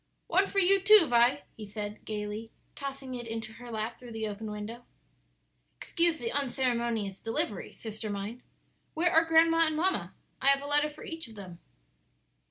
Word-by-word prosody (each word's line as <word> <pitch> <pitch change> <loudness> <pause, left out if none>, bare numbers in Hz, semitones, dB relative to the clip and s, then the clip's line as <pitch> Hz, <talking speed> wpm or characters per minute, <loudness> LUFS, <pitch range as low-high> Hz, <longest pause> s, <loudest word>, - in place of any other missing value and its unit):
"One 380 +3 +3
for - - -6
you, 390 +1 +5
too, 425 -2 +8
Vi," 245 +3 +4
he 220 - -9
said 210 0 -6
gayly, 210 +1 -4 0.3
tossing 275 -2 -6
it 240 -2 -6
into 225 -1 -5
her 240 +1 -11
lap 225 0 -3
through 245 -2 -10
the 220 -1 -2
open 210 +1 -5
window. 210 +3 -6 0.9
"Excuse 335 -1 +1
the 235 -4 -3
unceremonious 235 -7 -1
delivery, 225 -3 -2
sister 220 -1 -6
mine. 205 +4 -5 0.5
Where 340 +2 +2
are 325 -1 +6
grandma 330 0 +5
and 315 - -1
mamma? 375 +4 0 0.3
I 265 - +1
have 275 0 +5
a - - -6
letter 295 +1 +3
for 300 +1 -12
each 325 -4 -6
of 225 - -13
them." 185 -4 -10
240 Hz, 175 wpm, -30 LUFS, 220-310 Hz, 0.9 s, too